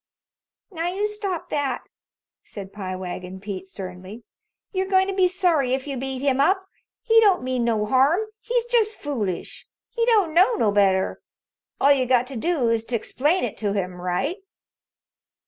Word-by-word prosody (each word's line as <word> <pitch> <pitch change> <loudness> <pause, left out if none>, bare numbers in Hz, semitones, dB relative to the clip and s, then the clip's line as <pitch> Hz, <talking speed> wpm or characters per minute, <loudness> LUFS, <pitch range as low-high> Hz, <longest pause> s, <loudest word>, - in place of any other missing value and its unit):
"Now, 335 -2 -3
you 400 +3 -1
stop 405 -5 -4
that," 275 -4 -1 0.6
said 195 -2 -9
Pie 185 -3 -5
Wagon 185 0 -6
Pete 190 -1 -6
sternly. 190 +4 -8 0.5
"You're 380 -1 -1
goin' 380 -1 +4
to 390 - -3
be 375 -1 +4
sorry 340 -8 +2
if 265 - -6
you 280 -2 -4
beat 265 0 -4
him 270 -2 +2
up. 380 +6 +2 0.4
He 455 -1 +5
don't 400 -7 +4
mean 255 -1 -1
no 220 -3 +1
harm. 270 - +3 0.2
He's 475 0 -1
just 455 -3 +2
foolish. 225 - -4 0.2
He 470 - -1
don't 410 -9 +3
know 375 +8 +5
no 215 - +2
better. 195 -2 +2 0.6
All 280 - +5
you 260 -3 +3
got 250 -1 +3
to - - -7
do 270 -1 0
is 230 -1 +1
to 245 - -2
explain 295 - 0
it - - -3
to 205 -2 -1
him 180 -3 -3
right." 180 - -1
270 Hz, 170 wpm, -23 LUFS, -, 0.6 s, He